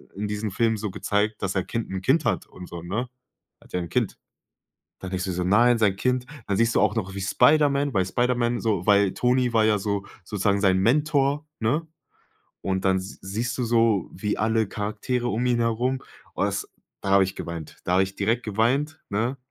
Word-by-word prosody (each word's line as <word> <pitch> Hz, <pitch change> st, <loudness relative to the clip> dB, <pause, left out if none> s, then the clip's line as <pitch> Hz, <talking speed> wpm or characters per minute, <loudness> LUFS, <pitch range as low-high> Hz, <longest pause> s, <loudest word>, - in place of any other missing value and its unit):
in 105 Hz, +2 st, -3 dB
diesem 105 Hz, +1 st, -3 dB
Film 115 Hz, +3 st, +1 dB
so 105 Hz, 0 st, -3 dB
gezeigt, 105 Hz, +3 st, -1 dB
dass 95 Hz, -, 0 dB
sein 95 Hz, -2 st, -1 dB
Kind 115 Hz, -1 st, -3 dB
'n 95 Hz, -1 st, -3 dB
Kind 145 Hz, -, +2 dB
hat -, -, 0 dB
und 90 Hz, -1 st, -11 dB
so, 85 Hz, -, -7 dB
ne?" 105 Hz, +9 st, -3 dB, 0.5 s
Er -, -, -21 dB
hat -, -, -20 dB
ja 90 Hz, -, 0 dB
'n 85 Hz, -1 st, -5 dB
Kind. -, -, 0 dB, 0.8 s
Dann 95 Hz, -, -7 dB
denkst 95 Hz, 0 st, -2 dB
dir 95 Hz, -, -2 dB
so: 90 Hz, 0 st, -2 dB
„Nein, 120 Hz, +6 st, +5 dB
sein 105 Hz, -4 st, +3 dB
Kind." 125 Hz, +4 st, 0 dB, 0.2 s
Dann 100 Hz, -, 0 dB
siehst 115 Hz, +2 st, +2 dB
du -, -, +4 dB
auch 105 Hz, +1 st, +3 dB
noch 95 Hz, -3 st, -2 dB
wie 100 Hz, -, -4 dB
Spiderman 140 Hz, +6 st, +3 dB
bei 95 Hz, -, +2 dB
Spiderman 120 Hz, +4 st, 0 dB
so 100 Hz, -6 st, 0 dB
weil 100 Hz, -2 st, +4 dB
Tony 125 Hz, 0 st, +2 dB
war 110 Hz, -1 st, +4 dB
ja 110 Hz, -1 st, +4 dB
so 100 Hz, 0 st, -2 dB, 0.2 s
sozusagen 100 Hz, +1 st, 0 dB
sein 95 Hz, -2 st, +4 dB
Mentor, 145 Hz, -, +2 dB
ne? 140 Hz, +9 st, 0 dB, 0.8 s
Und 95 Hz, 0 st, -2 dB
dann 95 Hz, 0 st, +4 dB
s 95 Hz, +1 st, -7 dB
siehst 115 Hz, +5 st, -3 dB
du 125 Hz, -, 0 dB
so, 115 Hz, -4 st, +2 dB
wie 105 Hz, +3 st, -2 dB
alle 110 Hz, 0 st, +1 dB
Charaktere 120 Hz, +4 st, -2 dB
um 120 Hz, +1 st, -1 dB
ihn 120 Hz, -1 st, +2 dB
herum 120 Hz, +3 st, 0 dB, 0.4 s
oh -, -, 0 dB
das, -, -, -2 dB, 0.3 s
da 100 Hz, -, -2 dB
habe 100 Hz, 0 st, +6 dB
ich 95 Hz, 0 st, -4 dB
geweint. 85 Hz, -2 st, -6 dB
Da 90 Hz, -, 0 dB
habe 95 Hz, +1 st, +5 dB
ich 95 Hz, 0 st, -6 dB
direkt 115 Hz, +4 st, 0 dB
geweint, 130 Hz, +9 st, 0 dB
ne? 115 Hz, +6 st, -1 dB
110 Hz, 210 wpm, -25 LUFS, 95-120 Hz, 0.8 s, habe